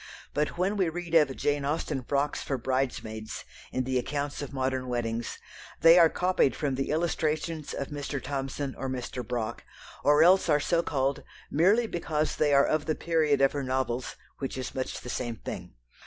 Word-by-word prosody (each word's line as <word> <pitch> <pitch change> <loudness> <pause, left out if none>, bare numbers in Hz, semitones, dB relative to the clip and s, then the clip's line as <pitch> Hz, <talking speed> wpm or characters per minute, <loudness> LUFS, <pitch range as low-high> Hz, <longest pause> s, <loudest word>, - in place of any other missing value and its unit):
But 150 +3 -1
when 190 +4 +1
we 185 -4 +2
read 170 0 -6
of 150 -5 +5
"Jane 145 -1 0
Austen 145 -1 -1
frocks" 140 +3 0
for 135 - -2
bridesmaids 120 -4 -3 0.3
in 130 - 0
the 130 0 0
accounts 145 +3 -3
of 145 - -5
modern 130 -1 -1
weddings, 120 -1 -2 0.4
they 165 +2 +8
are 165 -1 +7
copied 180 -6 +2
from 145 -4 -1
the 135 +1 -2
illustrations 155 -1 -1
of 140 - -4
Mr. 145 -1 -4
Thomson 135 0 -3
or 135 - -2
Mr. 125 -1 -4
Brock, 120 -3 -3 0.4
or 145 +2 +6
else 185 +1 +5
are 150 -1 +5
so 170 +3 +2
called 135 -4 0 0.3
merely 200 +10 +4
because 155 -6 -1
they 150 -1 +3
are 140 0 +6
of 155 0 0
the 155 - +1
period 155 -4 +2
of 135 - +5
her 145 - -2
novels, 130 -2 -2 0.2
which 135 -1 -4
is 130 - -4
much 130 -1 -3
the - - -10
same 120 -1 -3
thing. - - -7
140 Hz, 185 wpm, -28 LUFS, 130-155 Hz, 0.4 s, they